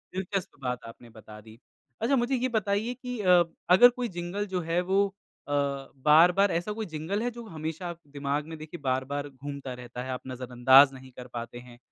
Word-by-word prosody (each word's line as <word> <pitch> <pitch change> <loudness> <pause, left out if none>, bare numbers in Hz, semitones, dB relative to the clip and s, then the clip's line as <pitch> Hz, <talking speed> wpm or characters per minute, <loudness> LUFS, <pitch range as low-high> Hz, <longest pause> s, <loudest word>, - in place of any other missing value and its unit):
दिलचस्प 190 0 -2
बात 125 -1 -2
आपने 115 +1 -13
बता 105 -1 -12
दी। 110 +1 -15 0.4
अच्छा 260 +5 +3
मुझे 250 +2 +1
ये 255 +1 0
बताइए 215 +3 0
कि 250 -2 -6
अब 175 -3 +4 0.2
अगर 245 +5 +9
कोई 245 - 0
जिंगल 175 +4 -3
जो 180 - +1
है 170 +1 +2
वो 200 +1 +4 0.4
अ, - - -6 0.6
बार-बार 180 +6 +6
ऐसा 175 +5 -1
कोई 220 0 -4
जिंगल 185 +8 -2
है 245 - 0
जो 235 0 -9
हमेशा 160 +1 -5
आप 170 - -6 0.2
दिमाग 140 +1 -1
में 160 -1 -7
देखिए 155 +2 -9
बार-बार 135 +2 -1
घूमता 135 -1 -7
रहता 125 0 -7
है, 130 - -7
आप 125 - -4
नज़रअंदाज 130 +2 +5
नहीं 130 0 -12
कर 125 0 -8
पाते 120 0 -6
हैं, 120 -1 -14
160 Hz, 195 wpm, -28 LUFS, 130-200 Hz, 0.6 s, अगर